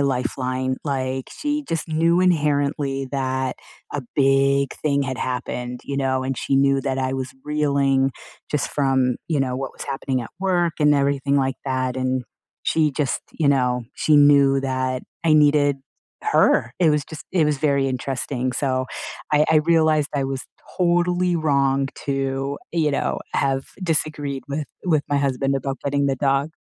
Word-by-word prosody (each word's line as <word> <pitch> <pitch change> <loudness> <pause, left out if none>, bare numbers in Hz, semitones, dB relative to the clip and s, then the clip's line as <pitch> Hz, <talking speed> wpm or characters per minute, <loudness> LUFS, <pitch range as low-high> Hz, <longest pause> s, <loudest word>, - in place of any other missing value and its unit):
lifeline, 130 -1 -1
like, 130 -2 -2
she 295 0 -2
just 165 0 -2
knew 165 +2 +2
inherently 145 -5 +1
that 130 -1 -1 0.4
a 145 - -2 0.2
big 135 0 +3
thing 140 -2 +2
had 130 -1 -3
happened, 125 -1 -3
you 140 - -4
know, 130 -1 0
and 130 -1 -3
she 135 - 0
knew 135 0 +3
that 135 -1 -2
I 130 0 -1
was 130 0 -4
reeling 140 -3 +2 0.4
just 150 -2 -1
from, 130 -3 +1
you 155 -3 +1
know, 130 -1 -1
what 135 0 -4
was - - -8
happening 135 -2 -2
at 115 - -9
work 175 -3 +1
and 150 0 +5
everything 140 0 +1
like 135 -1 +1
that, 130 -1 -1
and 130 -1 -1 0.4
she 155 -2 +2
just, 145 -1 -1
you 160 - -1
know, 125 -3 +2
she 155 -1 +3
knew 140 -1 +6
that 130 -1 -2 0.2
I 160 -2 +4
needed 145 -1 +4 0.5
her. 120 - +3
It 175 -3 +4
was 150 -1 +2
just 160 +1 -10
it 175 -4 +3
was 150 -2 0
very 140 -2 +2
interesting, 130 0 -2
so 130 -1 0 0.4
I 150 0 +4
I 160 - +5
realized 155 -2 +3
I 140 -1 0
was 135 0 -4 0.3
totally 175 0 +2
wrong 140 -3 +1 0.2
to, 135 0 -1 0.2
you 160 -3 +2
know, 140 - -1 0.2
have 135 -1 0 0.2
disagreed 150 -5 -1
with 145 +2 -2 0.2
with 155 -4 +3
my 145 - +2
husband 135 0 0
about 135 0 -2
getting 140 0 +1
the 135 -1 0
dog. 135 +2 +1
140 Hz, 165 wpm, -22 LUFS, 130-150 Hz, 0.5 s, knew